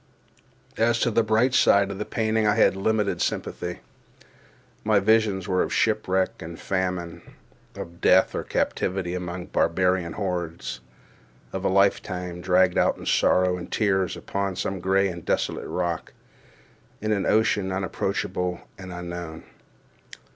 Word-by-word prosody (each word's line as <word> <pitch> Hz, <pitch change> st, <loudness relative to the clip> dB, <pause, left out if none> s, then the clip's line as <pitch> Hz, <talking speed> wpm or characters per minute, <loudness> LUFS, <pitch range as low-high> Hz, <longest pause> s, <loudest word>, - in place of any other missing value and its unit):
For 115 Hz, +1 st, +2 dB, 0.2 s
the 115 Hz, -, +3 dB
bright 110 Hz, +4 st, +2 dB
side 100 Hz, -5 st, +4 dB
of 100 Hz, -, -6 dB
the 105 Hz, -, -2 dB
painting 110 Hz, -1 st, 0 dB
I 105 Hz, -, +3 dB
had -, -, +4 dB
a 95 Hz, -, -7 dB
limited 105 Hz, 0 st, 0 dB
sympathy. -, -, -3 dB, 1.0 s
My 105 Hz, -1 st, +4 dB
visions 105 Hz, -2 st, +2 dB
were 90 Hz, -2 st, +2 dB
of -, -, -1 dB
shipwreck 95 Hz, 0 st, +1 dB
and 85 Hz, 0 st, -8 dB
famine; 90 Hz, -3 st, -2 dB, 0.5 s
of 85 Hz, +1 st, -9 dB
death 95 Hz, +1 st, +5 dB
or -, -, -2 dB
captivity 90 Hz, -1 st, -1 dB
among 90 Hz, 0 st, -4 dB
barbarian 90 Hz, -1 st, +1 dB
hordes; 85 Hz, -, -4 dB, 0.7 s
of 95 Hz, -, -4 dB
a -, -, +2 dB
lifetime 90 Hz, -2 st, +1 dB
dragged 90 Hz, 0 st, +3 dB
out -, -, +2 dB
in -, -, -10 dB
sorrow 90 Hz, 0 st, +3 dB
and 90 Hz, 0 st, -8 dB
tears, 95 Hz, -4 st, +1 dB
upon 100 Hz, -1 st, -3 dB
some 95 Hz, +1 st, -3 dB
gray 95 Hz, +2 st, +2 dB
and 85 Hz, -3 st, -6 dB
desolate -, -, -1 dB
rock, 85 Hz, -2 st, -3 dB, 0.9 s
in 110 Hz, +1 st, -2 dB
an 100 Hz, -2 st, 0 dB
ocean 105 Hz, -3 st, +2 dB
unapproachable 90 Hz, -1 st, -2 dB, 0.2 s
and 95 Hz, -1 st, -8 dB
unknown. 85 Hz, -2 st, -6 dB
95 Hz, 140 wpm, -25 LUFS, 90-100 Hz, 1.0 s, death